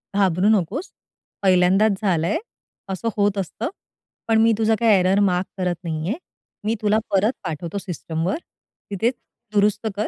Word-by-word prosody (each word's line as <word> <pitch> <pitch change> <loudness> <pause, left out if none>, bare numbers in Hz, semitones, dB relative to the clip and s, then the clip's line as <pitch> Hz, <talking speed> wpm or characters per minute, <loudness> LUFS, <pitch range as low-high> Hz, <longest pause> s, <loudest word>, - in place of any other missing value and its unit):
"घाबरू 190 -1 +3
नकोस, 215 - -5 0.5
पहिल्यांदाच 190 +2 +4
झालाय, 175 - +1 0.6
असं 190 +5 -4
होत 205 0 +2
असतं. 195 - -3 0.6
पण 225 -1 +3
मी 225 0 +5
तुझा 220 0 +3
काही 230 -1 +4
एरर 185 +2 +3
मार्क 180 +1 0
करत 180 -2 0
नाही 160 -1 -3
आहे. 225 - -1 0.5
मी 220 +2 +1
तुला 210 0 +3
परत 200 +5 +3
पाठवतो 165 +4 -4
सिस्टमवर. 170 - -3 0.5
तिथे 205 +4 +1 0.4
दुरुस्त 210 +2 +2
कर 210 +1 -1
195 Hz, 145 wpm, -22 LUFS, 180-215 Hz, 0.6 s, मी